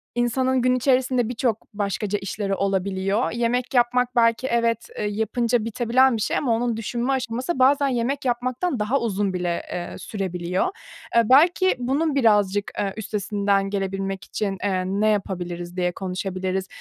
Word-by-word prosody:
insanın 255 +2 +1
gün 255 0 +3
içerisinde 255 -2 +2
birçok 235 -4 -2
başkaca 205 0 -2
işleri 195 0 -3
olabiliyor. 195 +2 0
Yemek 240 +2 -1
yapmak 250 0 +2
belki 230 +2 +3
evet, 230 -1 0
eee, - - -1
yapınca 225 +2 0
bitebilen 240 +2 +3
bir - - -4
şey - - 0
ama 255 -5 0
onun 235 -1 -1
düşünme 240 +4 -1
aşaması 255 +3 -2
bazen 280 +2 +4
yemek 265 +3 -1
yapmaktan 255 +4 -1
daha 230 +7 +1
uzun 205 -4 -1
bile, 175 -1 -1
eee, 175 - -5
sürebiliyor. 180 - -2 0.5
Eee, 235 - +7
belki 345 +7 +5
bunun 280 +4 0
birazcık, 205 -5 +2
eee, 195 -1 -1
üstesinden 200 -2 0
gelebilmek 195 -1 -3
için, 195 -2 -3
eee, 185 -2 0
ne 200 +3 0
yapabiliriz, 175 -3 -3
diye 180 0 +1
konuşabiliriz. 185 0 -3
220 Hz, 145 wpm, -23 LUFS, 195-250 Hz, 0.5 s, Eee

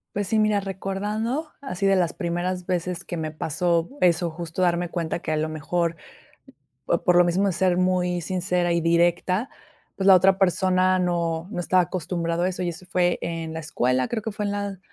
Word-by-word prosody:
Pues 205 -2 -1
sí, 220 +2 +2
mira, 215 -1 +3
recordando 210 - -3
así 200 -8 -3
de 195 0 +4
las 175 -3 +2
primeras 175 +1 -3
veces 180 -1 -2
que 175 - -5
me 155 -1 -3
pasó 165 +2 0
eso, 170 -1 +3
justo 165 +2 -5
darme 175 -1 +1
cuenta 170 -1 -2
que 155 - -4
a 155 - +1
lo 155 - 0
mejor 165 +2 -1 0.9
o - - +1
por 180 - +3
lo 175 - +7
mismo 185 +4 +1
de 190 - 0
ser 180 0 +2
muy 180 -1 +1
sincera 180 +1 -1
y 170 - +1
directa, 175 +6 +2 0.5
pues, 195 - -1
la 195 - +9
otra 190 +1 +5
persona 185 0 +3
no 170 -1 -1
no 180 - -3
estaba 180 0 +3
acostumbrado 170 0 -2
a 180 - +2
eso 185 0 -5
y 175 - -1
eso 175 +2 -7
fue 175 -1 +1
en 165 -1 -4
la 160 - -4
escuela, 130 -4 0
creo 225 -2 -3
que 220 - -4
fue 210 +1 -4
en 205 - -1
la 200 -1 -3
180 Hz, 205 wpm, -24 LUFS, 170-190 Hz, 0.9 s, la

